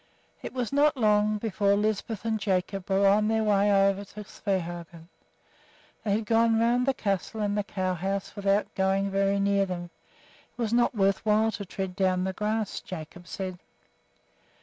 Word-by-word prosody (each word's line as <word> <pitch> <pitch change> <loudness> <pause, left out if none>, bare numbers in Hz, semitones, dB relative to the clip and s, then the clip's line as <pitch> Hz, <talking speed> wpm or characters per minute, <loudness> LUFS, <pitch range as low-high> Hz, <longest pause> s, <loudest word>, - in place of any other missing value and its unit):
It - - -6
was 250 -1 -3
not 295 +1 +3
long 210 -2 +3
before 205 -2 +1
Lisbeth 215 +1 -2
and 220 -1 0
Jacob 190 -1 -2
were 195 +1 +3
on 210 +2 +4
their 220 0 +1
way 205 -1 +3
over 195 0 +3
to 210 +1 -10
Svehaugen. 175 -4 -5 0.9
They 205 - 0
had 215 +1 -1
gone 225 +1 +3
round 240 +2 +2
the 270 - +3
castle 200 +1 -2
and 205 -1 0
the 210 - +1
cow 185 -2 -2
house 195 +3 -3
without 200 0 0
going 195 +1 +1
very 195 0 +1
near 200 0 +2
them, 175 -1 -5 0.6
it - - -28
was 230 -1 -1
not 240 0 +2
worth 195 -1 +2
while 220 +1 +3
to 200 -1 -6
tread 190 0 -5
down 185 -1 +1
the 190 0 -2
grass, 215 +1 -2
Jacob 175 -4 -9
said. 185 -2 -5
200 Hz, 170 wpm, -27 LUFS, 190-215 Hz, 0.9 s, on